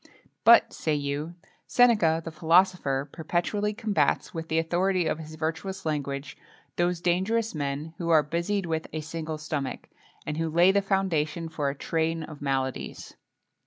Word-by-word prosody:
[XXII - - -25
2] - - -32
"But," 235 0 +7
say 155 -2 -1
you, 145 +3 -3 0.3
"Seneca, 210 -10 +4
the 165 - -5
philosopher, 160 -4 +2
perpetually 175 +6 -1
combats, 210 - 0
with 165 -1 -5
the 160 - 0
authority 175 +2 +1
of 160 0 -1
his 155 0 -9
virtuous 165 +5 -4
language, 145 -2 -3 0.4
those 175 0 0
dangerous 200 +6 +1
men 145 +1 -3
who 170 -1 -2
are 155 -2 +6
busied 170 +6 -1
with 160 -1 -2
a 155 - -2
single 160 0 -5
stomach,[XXII 150 -3 -4
3] - - -39 0.3
and 150 0 -3
who 165 0 -1
lay 170 +4 +5
the 200 +1 +2
foundation 170 -5 0
for 150 -3 -1
a 140 - -4
train 165 +2 -1
of 150 -2 -10
maladies." 135 -2 -3
160 Hz, 165 wpm, -27 LUFS, 150-180 Hz, 0.4 s, But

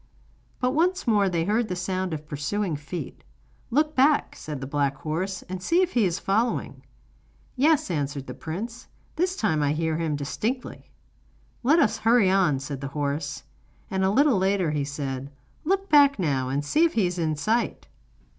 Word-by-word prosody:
But 250 -1 +1
once 355 +5 +1
more 205 -5 +3
they 170 -2 0
heard 215 +4 +1
the 180 - -3
sound 185 0 -2
of 155 -1 -5
pursuing 155 +5 -2
feet. 145 +5 -7 0.5
'Look 300 +5 +2
back,' 285 +3 +3
said 150 -3 -6
the 135 - -5
black 140 0 0
horse, 170 +7 -3
'and 185 0 -6
see 345 - +3
if 365 - -1
he 235 -4 +3
is 175 -2 0
following.' 220 +5 -1 0.7
'Yes,' 285 - +3
answered 140 -3 -2
the - - -7
prince, 220 +9 -6 0.3
'this 365 +3 0
time 160 - +1
I 145 0 +2
hear 160 0 -1
him 160 -3 -1
distinctly. 215 - -4 0.7
'Let 285 +7 +4
us 315 - +2
hurry 225 -4 +4
on,' 185 -8 +3
said 135 0 -6
the 140 - -3
horse. 145 0 -2 0.5
And 190 0 0
a 190 - +3
little 265 0 +4
later 190 -3 +1
he 145 -2 -1
said: 140 -2 -4 0.4
'Look 390 +3 +1
back 285 -3 +6
now, 135 -8 0
and 140 +2 -1
see 305 - +3
if 335 - +3
he 215 -5 +2
is 180 0 -2
in 155 -2 0
sight. 220 +10 -1
185 Hz, 180 wpm, -25 LUFS, 150-240 Hz, 0.7 s, back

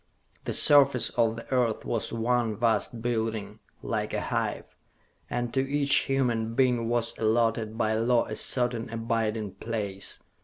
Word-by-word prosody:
The - - -2
surface 140 -4 +6
of 115 -2 +1
the 115 - -10
Earth 120 -4 0
was 115 - -2
one 115 -1 -1
vast 115 0 0
building, 110 -3 -3 0.2
like - - -3
a - - -1
hive, - - -2 0.7
and 120 -1 -3
to 135 - +1
each 140 +1 0 0.2
human 120 -4 0
being 125 -3 +1
was 120 -1 0
allotted 115 0 0
by 110 -1 0
law 115 +2 +2
a 110 - -6
certain 120 -2 +1
abiding 115 -2 -2
place. 100 -1 -4
115 Hz, 145 wpm, -27 LUFS, 110-120 Hz, 0.7 s, surface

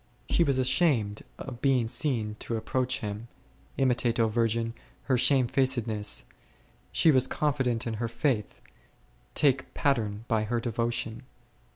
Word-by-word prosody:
She 170 - +4
was 140 -4 +1
ashamed 130 -5 +2 0.2
of 125 -2 -8
being 130 -4 +2
seen 120 -3 0
to 115 - -3
approach 130 +3 -1
Him; 105 +2 -5 0.5
imitate, 125 -3 +1
O 115 - +4
virgin, 115 0 0 0.3
her 130 - +1
shamefacedness; 125 -4 +2 0.7
she 165 - +4
w - - +2
r - - +6
as 130 - +4
confi 145 -3 0
dent 120 -2 -1
in 115 - -2
her 115 - 0
faith, 115 -2 -1 0.7
take 135 -2 +2
pattern 115 -6 0
by 110 -2 +1
her 120 +2 -1
devotion. 115 0 -2
120 Hz, 145 wpm, -28 LUFS, 115-130 Hz, 0.7 s, r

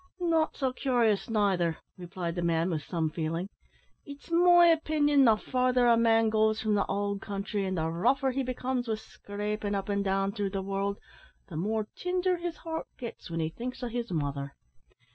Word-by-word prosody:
"Not 330 -3 +1
so 260 -3 0
cur'ous 240 -7 +1
neither," 190 -7 +1 0.2
replied 175 -1 -5
the 175 - -3
man, 170 +1 +1
with 155 -2 -1
some 160 0 -2
feeling; 165 +3 -3 0.5
"it's 285 +3 -12
my 350 0 +6
opinion, 300 -4 +4
the 225 -2 +6
further 250 +2 +1
a 235 -1 +6
man 225 -1 +4
goes 220 0 +2
from 215 -1 0
the 200 -1 +1
owld 200 0 -1
country, 200 0 -3
and 190 -1 -2
the 160 0 0
rougher 250 +11 +1
he 270 +2 -1
becomes 255 -1 -2
wi' 220 - 0
scrapin' 205 0 -4
up 195 +1 -3
and 200 0 0
down 195 0 0
through 205 -1 -2
the 195 0 -3
world, 195 +1 -2 0.5
the 170 - -8
more 215 +6 -1
tinder 365 0 0
his 345 -1 -4
heart 320 -1 -5
gits 235 -6 -8
when 165 0 -2
he 160 - -1
thinks 250 +8 -6
o' 245 - -2
his 235 -1 -4
mother. 140 -3 -3
215 Hz, 185 wpm, -29 LUFS, 190-255 Hz, 0.5 s, my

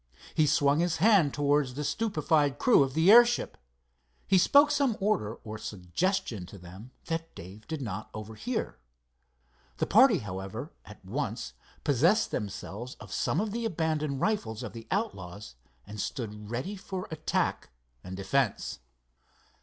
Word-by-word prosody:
He 155 - +3
swung 145 0 +3
his 175 -1 +1
hand 195 -6 +5
towards 145 -2 +1
the 150 - -3
stupefied 155 -8 +1
crew 240 - +5
of 135 0 0
the 165 +5 +5
airship. 240 +1 +6 0.7
He 190 -1 +5
spoke 285 - +6
some 270 -6 +1
order 155 - 0
or 110 -1 -7
suggestion 105 - -2
to 100 - -11
them 95 +6 -12 0.2
that 165 0 -4
Dave 95 +5 -11
did 160 -4 -4
not 110 -2 -5
overhear. 110 - -4 1.0
The - - 0
party, 230 -1 +6
however, 95 - -6
at - - -14
once - - -3 0.3
possessed 165 - +3
themselves 105 +4 -5
of - - -11
some 160 - 0
of 210 0 -1
the 235 +2 -3
abandoned 155 -8 -1
rifles 115 - -1
of - - -6
the 115 -1 -10
outlaws 105 - -4 0.3
and 105 0 -6
stood 105 -5 -5
ready 130 - -3
for 190 -1 -6
attack 155 0 -1 0.3
and 95 0 -7
defence. 110 +4 -1
145 Hz, 145 wpm, -29 LUFS, -, 1.0 s, airship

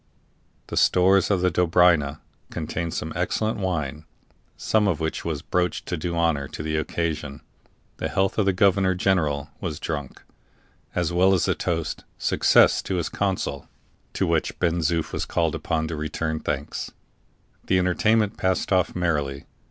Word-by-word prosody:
The - - -6
stores 95 +2 +4
of 100 -3 +2
the 90 0 +2
Dobryna 85 -4 +3 0.3
contained 85 -1 -4
some - - -4
excellent 110 0 -1
wine, 75 -5 -2 0.5
some 105 -1 +2
of 85 -6 0
which 80 0 -2
was 80 -4 -3
broached 90 -1 -1
to 90 - -2
do 85 +1 -3
honor 80 -5 +1
to 75 +1 -7
the 80 0 -2
occasion. 75 -2 -3 0.6
The - - -3
health 95 +3 0
of 100 - +2
the - - +5
governor 95 0 +3
general 80 -6 0
was 80 -4 -4
drunk, 75 -6 -5 0.7
as 85 -1 0
well 95 +2 +4
as 90 - +1
the - - +2
toast 80 -3 -3
"Success - - +4
to 95 - -3
his 85 -3 -1
council," 95 -8 -2 0.4
to - - 0
which - - 0
Ben 85 -1 +1
Zoof 80 +1 0
was - - -2
called 80 -3 0
upon 80 0 -1
to 80 - -3
return 80 +1 -3
thanks. 75 -1 -4 0.8
The 95 - +3
entertainment 105 +4 +2
passed 95 +1 0
off 90 -1 +2
merrily. 75 -6 -1
85 Hz, 160 wpm, -24 LUFS, 75-95 Hz, 0.8 s, the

